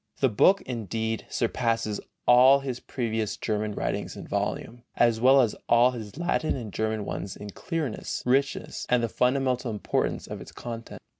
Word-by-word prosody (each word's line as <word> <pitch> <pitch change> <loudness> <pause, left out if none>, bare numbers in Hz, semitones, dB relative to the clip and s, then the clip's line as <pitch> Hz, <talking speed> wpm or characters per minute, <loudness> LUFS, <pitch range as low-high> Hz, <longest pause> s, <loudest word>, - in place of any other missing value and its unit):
The 135 - +3
book, 185 - +4
indeed, 110 -2 -3
surpasses 115 -3 -1 0.2
all 130 +3 +7
his 130 -3 -4
previous 110 -4 -3
German 105 -1 -2
writings - - -3
in - - -8
volume, 120 +1 -3
as 115 -1 +3
well 135 +2 +7
as 115 -4 +1
all 120 +2 +6
his 110 -1 -8
Latin 170 -2 0
and 115 -7 -6
German 110 -1 -1
ones 95 - -5
in 105 0 -8
clearness, 155 - -4
richness 135 +3 0
and 125 -1 +3
the - - +2
fundamental 125 +1 +1
importance 105 -2 -1
of - - -7
its - - -10
content. 115 -1 -8
120 Hz, 160 wpm, -27 LUFS, 110-130 Hz, 0.2 s, all